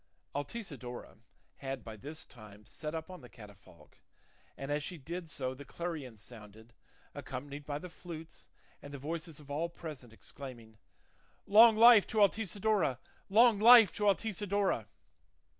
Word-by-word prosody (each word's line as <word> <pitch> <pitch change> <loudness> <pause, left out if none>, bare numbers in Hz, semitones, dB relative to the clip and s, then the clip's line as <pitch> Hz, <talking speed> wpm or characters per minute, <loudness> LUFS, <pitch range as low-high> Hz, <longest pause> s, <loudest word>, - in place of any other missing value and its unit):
Altisidora 145 - -7 0.4
had 135 -3 -5
by 110 -1 -8
this 150 - -8
time 105 -3 -15
sat 155 +7 -6
up 160 +3 -6
on 180 - -10
the 125 - -13
catafalque, 100 -7 -16 0.6
and 135 +1 -5
as 150 +1 0
she 175 +4 -6
did 165 +4 -7
so 130 -3 -3
the 135 +2 -10
clarions 140 -8 -6
sounded, 110 0 -14 0.4
accompanied 145 +1 -7
by 145 -1 -2
the 180 - -8
flutes, 165 -2 -11 0.3
and 145 - -10
the 140 - -6
voices 160 +2 -6
of 145 -1 -13
all 160 +4 -1
present 150 -8 -9
exclaiming, 115 -2 -10 0.7
"Long 220 +2 +7
life 230 -2 +8
to 220 - -5
Altisidora! 205 - +2 0.3
long 225 +1 +5
life 230 -2 +9
to 210 - -1
Altisidora!" 200 - -1
150 Hz, 140 wpm, -32 LUFS, 125-185 Hz, 0.7 s, life